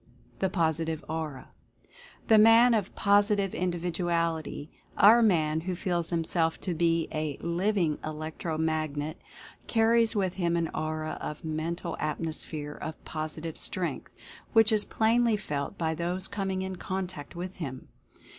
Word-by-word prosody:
THE 190 - +1
POSITIVE 160 -2 0
AURA. 155 -4 -5 0.8
The 220 -2 +7
man 225 +3 +7
of 210 -4 -1
Positive 205 -1 +3
Individuality 170 -3 -2
— - - -30
our 235 +1 +5
man 160 -7 +2
who 180 +2 -3
feels 175 -3 -1
himself 165 -1 0
to 180 - -2
be 165 0 +1
a 155 -2 -2
"Living 170 -2 0
Electro 155 +1 -4
Magnet" 155 -1 -2 0.2
— - - -21
car 225 -1 +4
ries 230 -1 +4
with 190 -3 0
him 170 -2 0
an 165 -1 0
aura 155 0 -3
of 150 +1 -6
Mental 165 +2 -3
Atmosphere 155 -1 -3
of 155 +1 -6
Posi 155 0 -5
tive 165 -2 -6
Strength, 180 -2 -2 0.4
which 225 -1 +6
is 215 -1 +3
plainly 230 0 +2
felt 150 -2 -4
by 160 -1 0
those 175 +4 -1
coming 190 -2 -2
in 190 -1 -5
contact 185 -6 -5
with 180 +2 -6
him. 135 -7 -6
170 Hz, 145 wpm, -28 LUFS, 155-190 Hz, 0.8 s, The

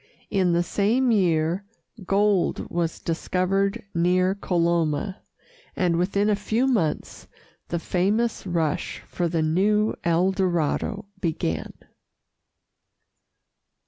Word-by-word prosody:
In 185 -3 +2
the 170 +1 +2
same 230 +8 +1
year 175 -3 +2 0.4
gold 200 -2 +1
was 170 -1 -1
discovered 195 +6 -1
near 180 +2 +2
Coloma, 170 -1 0 0.5
and 175 -2 +1
within 200 +4 +1
a 210 - +3
few 220 +5 0
months 210 - -1 0.4
the 170 - -2
famous 195 +7 0
rush 165 -4 -1
for 175 - -1
the 165 -1 0
new 210 +7 +2
El 170 +2 +2
Dorado 190 +2 -1
began. 120 - -2
185 Hz, 100 wpm, -24 LUFS, 170-200 Hz, 0.5 s, a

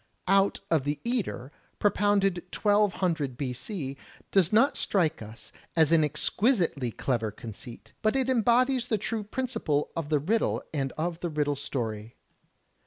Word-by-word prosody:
"Out 195 +1 +3
of 160 -5 +3
the 145 +1 -2
eater," 230 - -2 0.3
propounded 200 -3 +2
1200 185 - +1
B.C., 135 - -4 0.4
does 190 -3 +3
not 230 +6 +4
strike 165 - +1
us 110 +2 -11 0.2
as 160 -2 +4
an 165 -2 +5
exquisitely 160 - +1
clever 115 -1 -1
conceit, 115 +3 -10
but 215 +3 +2
it 265 -1 +1
embodies 250 +1 +3
the 220 - +1
true 215 +2 -3
principle 220 - -2
of 165 -3 -3
the 155 - +3
riddle 200 +11 0
and 135 -3 -1
of 165 +1 -3
the 175 - -3
riddle 150 -2 0
story. 115 -6 -4
165 Hz, 140 wpm, -28 LUFS, 140-210 Hz, 0.4 s, an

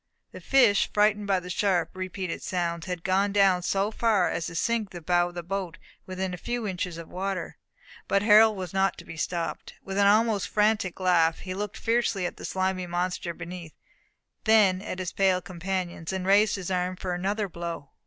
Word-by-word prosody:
The - - -10
fish, 240 -7 +4
frightened 210 0 +2
by 195 -2 +2
the 180 0 -8
sharp 180 -3 +1
repeated 185 -1 -5
sounds, 170 -1 -2
had 180 -2 -4
gone 195 +2 +2
down 195 -3 +4
so 195 +3 0
far 215 -5 +2
as 170 - -2
to 170 - -8
sink 225 +3 0
the 175 - -8
bow 175 +1 +1
of 175 - -15
the 175 - -5
boat 185 -1 -4 0.3
within 185 0 -3
a - - -4
few 240 +4 -3
inches 180 -3 -3
of 165 -1 -8
the - - -18
water. 190 +1 -4 0.5
But 200 0 +2
Harold 215 0 +6
was 185 -2 -6
not 195 -1 +1
to - - -11
be - - -9
stopped. 165 +2 -4
With 195 +1 -3
an 200 - +5
almost 215 -1 +3
frantic 210 -4 +1
laugh, 170 -3 +3
he 185 - -5
looked 205 +2 -4
fiercely 230 -5 0
at - - -4
the - - -8
slimy 185 -1 -1
monster 175 0 -2
beneath, 170 -1 -9 0.7
then 205 -4 +5
at 190 - -5
his 185 -2 -4
pale 190 -2 +3
companions, 180 -2 -4
and 190 -1 -3
raised 205 +2 +4
his 190 -2 -5
arm 180 0 -1
for 180 0 -4
another 200 +4 -1
blow. 170 -4 -6
185 Hz, 200 wpm, -27 LUFS, 175-200 Hz, 0.7 s, Harold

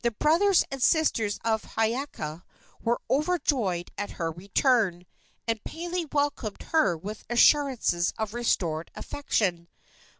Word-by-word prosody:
The 235 - +3
brothers 335 - +3
and 270 -1 -5
sisters 240 -10 +2
of 220 -1 +1
Hiiaka 225 - -2 0.4
were 235 +1 0
overjoyed 275 - 0
at 205 - -3
her 165 -1 -1
return, 195 - +1 0.4
and 225 -2 -1
Pele 345 +1 -4
welcomed 285 -7 -1
her 200 - +3
with 205 +6 -7
assurances 240 - +3
of 220 -1 -3
restored 170 -9 0
affection. 180 -11 -1
230 Hz, 120 wpm, -27 LUFS, 185-285 Hz, 0.4 s, The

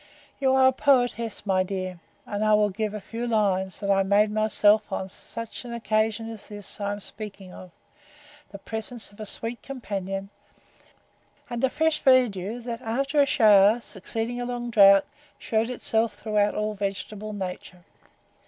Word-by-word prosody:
You 265 -1 +3
are 265 0 +5
a - - +5
poetess, 245 -6 +1
my 190 -2 +2
dear; 185 -1 -4 0.3
and 205 0 -3
I 215 0 +5
will 210 -1 +2
give 215 +1 -3
you - - -3
a - - -9
few 230 +4 -5
lines, 195 -4 0
that 200 -1 0
I 195 0 +4
made 205 +2 +3
myself 215 0 +3
on 190 - -3
such 230 +5 -6
an 235 -1 -6
occasion 220 0 0
as 225 -2 -9
this 205 0 -8
I 200 0 -1
am 205 - -6
speaking 200 -3 -9
of, 185 - -11 0.8
the 200 - -9
presence 220 +1 -5
of 205 - -20
a 215 - -6
sweet 230 +4 -4
companion, 195 -6 -5 1.2
and 240 -1 -3
the 265 - +3
fresh 320 +2 0
verdure, 235 -5 +3
that, 235 0 -5
after 275 +5 +1
a 280 - +3
shower, 210 -2 +5
succeeding 230 +3 -4
a - - -2
long 240 -1 -4
drought, 195 -2 +7 0.3
shewed 225 +1 -1
itself 225 -3 0
throughout 210 -1 0
all 210 0 -1
vegetable 205 +1 -4
nature. 180 -2 -7
215 Hz, 170 wpm, -25 LUFS, 200-235 Hz, 1.2 s, drought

